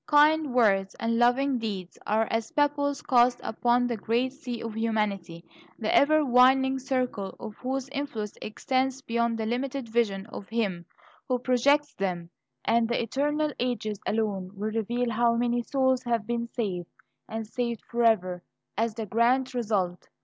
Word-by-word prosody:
Kind 300 0 +4
words 195 -5 +3
and 230 0 -1
loving 250 +2 +3
deeds 195 -5 -5
are 220 +1 +2
as 225 0 -1
pebbles 290 -1 +1
cast 245 -1 +4
upon 240 +2 +1
the 240 -2 -1
great 240 +5 0
sea 250 -5 -6
of 230 -1 -5
humanity, 200 -7 -2 0.3
the 220 -2 0
ever 310 +1 +5
widening 265 +1 +4
circle 250 -7 -2
of 210 - -7
whose 265 +1 -3
influence 275 -7 -4
extends 260 +4 -1
beyond 235 -1 0
the 220 - -2
limited 255 +2 -2
vision 220 -4 0
of 195 - -8
him 195 -7 -2 0.4
who 255 - +1
projects 280 +4 +2
them; 175 -6 -3 0.3
and 230 0 +3
the 240 - +1
eternal 295 +5 0
ages 230 -4 -2
alone 205 -4 -1
will 210 +2 -3
reveal 235 +2 -1
how 235 +1 +2
many 240 0 +1
souls 260 +1 +1
have 235 -4 -1
been 235 0 -2
saved, 190 -8 -3 0.4
and 225 0 -4
saved 235 0 -3
forever, 220 -7 +1 0.3
as 225 +1 0
the 225 -2 -4
grand 250 +5 +2
result. 205 -7 -1
235 Hz, 155 wpm, -27 LUFS, 215-260 Hz, 0.4 s, ever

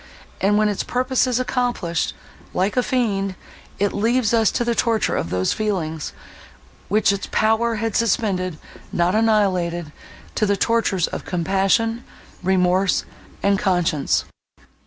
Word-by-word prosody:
And, 205 +2 +3
when 215 0 +3
its 205 -2 -1
purpose 255 +1 +1
is 250 -1 +1
accomplished, 245 -10 -1 0.4
like 190 +3 +1
a 250 - +3
fiend, 200 -7 0 0.4
it 205 0 0
leaves 230 +2 +1
us 225 -2 +4
to 240 - 0
the 235 - +1
torture 230 -1 +1
of - - -2
those 90 +1 0
feelings, 170 -8 -2 0.8
which 205 +1 +3
its 200 -1 -4
power 225 +1 +2
had 225 -1 -2
suspended—not 185 -5 -1
annihilated,—to 190 -5 -1
the 200 0 +1
tortures 215 -5 +1
of - - -6
compassion, 195 +6 +1 0.4
remorse, 185 0 +2 0.4
and 200 -1 +3
conscience. 175 -6 +1
200 Hz, 125 wpm, -21 LUFS, 185-230 Hz, 0.8 s, us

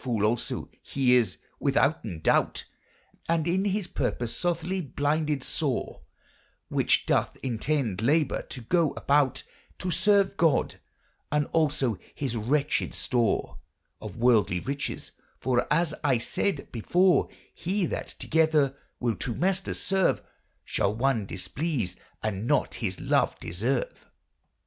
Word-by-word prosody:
A - - -18
fole 115 -5 +1
also 115 +2 -1
he 130 -2 +2
is 115 -7 +3 0.2
withouten 135 - +1
doute, - - +2 0.6
And 165 -1 +1
in 190 +3 +1
his 205 -1 0
porpose 120 -3 -2
sothly 175 +1 -1
blyndyd 150 -1 0
sore, 140 -4 -2 0.7
Which - - +2
doth - - +1
entende 125 -4 -1
labour 145 +4 +2 0.2
or - - -7
go 170 -4 +2
aboute 140 -2 +2 0.3
To 180 - -3
serve 195 +3 +3
god, 160 -4 +2 0.5
and 150 0 +2
also 145 - +1 0.2
his 135 -5 -2
wretchyd 140 +7 0
store 120 -4 0 0.4
Of 105 -2 -8
worldly 110 -7 +3
ryches: 140 +1 -4 0.3
for 125 -1 0
as 160 0 +2
I 135 -4 +3
sayde 140 +6 -2
before, 175 - +3 0.2
He 190 +2 -1
that - - -4
togyder 155 -4 +2 0.2
will 120 -2 +1
two 120 -3 -3
maysters 190 +1 0
serve 190 -1 +1 0.4
Shall 100 +2 0
one 115 -4 +1
displease 125 - -2 0.3
and 110 0 -2
nat 145 - +2
his 95 -5 -3
love - - +1
deserve. 115 +10 -2
140 Hz, 125 wpm, -27 LUFS, 120-165 Hz, 0.7 s, is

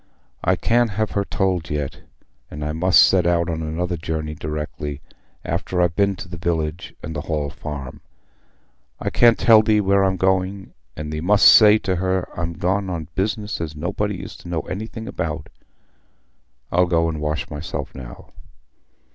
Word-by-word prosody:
"I - - +3
can't 120 0 +2
have 110 -1 0
her 100 - 0
told 95 -4 -1
yet; 75 -2 -3 0.5
and 75 0 -6
I 75 - -1
must 85 +4 +5
set 90 -2 +3
out 85 0 +1
on 80 0 -3
another 85 +3 -2
journey 80 -1 -3
directly, 75 -1 -5 0.5
after 90 - -2
I've 90 -2 +2
been 100 +1 +2
to 90 - -9
the 90 -2 -8
village 80 -1 -2
and 80 - -5
th' 75 0 -5
Hall 75 -3 -2
Farm. 70 -5 -7 1.0
I - - -2
can't 120 -1 +5
tell 110 -2 +7
thee 110 -1 +3
where 100 -1 +3
I'm 95 -1 +1
going, 95 +1 0 0.2
and 75 0 -5
thee 75 - -3
must 100 +4 +4
say 105 -1 +8
to 95 -4 -2
her 95 0 0
I'm 85 -1 -3
gone 95 +3 -1
on 85 -3 -4
business 105 0 -2
as 75 -2 -4
nobody 95 +4 -3
is - - -8
to 85 - -11
know 85 -2 -1
anything 110 +5 -6
about. 80 -3 -4 1.2
I'll 90 +1 +3
go 85 -1 +2
and 80 -2 -3
wash 75 0 -2
myself 75 +2 -5
now." 65 -2 -11
85 Hz, 170 wpm, -22 LUFS, 75-95 Hz, 1.2 s, say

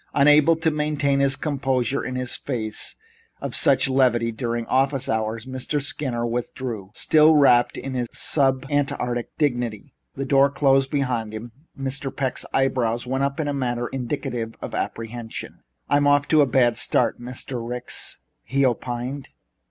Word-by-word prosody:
Unable 150 +3 +6
to 160 0 0
maintain 150 -2 0
his 140 -1 +3
composure 135 -3 -1
in 130 - -4
the 125 0 -2
face 115 -3 -3 0.4
of - - -5
such - - +4
levity 125 -3 +2
during 115 0 -3
office 135 +1 +1
hours, 110 0 -2
Mr. 130 +3 -2
Skinner 135 -4 -2
withdrew, 120 -3 -4
still 155 0 +5
wrapped 125 -4 +4
in 135 - -5
his 125 -2 -1
sub 135 -3 +1
Antarctic 125 -4 -1
dignity. 120 -7 -1 0.2
As - - -25
the 135 - -2
door 135 +1 +4
closed 135 -1 +2
behind 125 -6 -1
him, 115 +2 -7 0.3
Mr. 135 +1 -3
Peck's 130 -1 -3
eyebrows 125 -3 +1
went 130 +2 -1
up 140 +3 -1
in 155 - -1
a 145 - -1
manner 120 -3 -2
indicative 125 -3 -4
of - - -7
apprehension. 115 0 -5 0.3
"I'm 145 0 +3
off 145 0 +3
to 155 -2 +5
a 140 - +4
bad 120 -2 +3
start, - - +1
Mr. 125 +1 -5
Ricks," 125 +1 -2 0.2
he 140 0 +1
opined. 125 +2 -3
130 Hz, 155 wpm, -23 LUFS, 120-140 Hz, 0.4 s, Unable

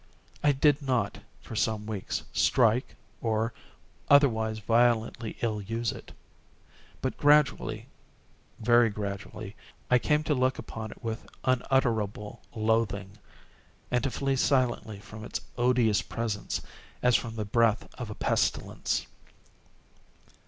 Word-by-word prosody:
I 145 - +5
did 145 +1 +3
not, 125 -7 0 0.2
for 115 - -9
some 110 -1 0
weeks, 105 -3 -3
strike, 120 -1 +3 0.3
or 110 0 0 0.6
otherwise 110 -7 +4
violently 115 +1 +1
ill 110 -3 0
use 115 +3 -2
it; - - -10 0.9
but 130 - -1
gradually—very 120 -4 +1
gradually—I 105 +3 -3
came 150 +4 +2
to 155 - +1
look 130 -1 +1
upon 110 -1 -6
it - - -13
with 115 0 -4
unutterable 120 -5 0
loathing, 110 -2 0 0.7
and 125 -1 +1
to 135 - +1
flee 135 +1 -1
silently 125 -6 +1
from 110 +1 -10
its - - -4
odious 120 -3 +3
presence, 115 -3 -3 0.4
as 125 -1 +5
from 115 0 -1
the 110 -2 -3
breath 115 +1 +2
of 120 -3 -5
a 105 - -6
pestilence. - - 0
115 Hz, 115 wpm, -28 LUFS, 110-125 Hz, 0.9 s, I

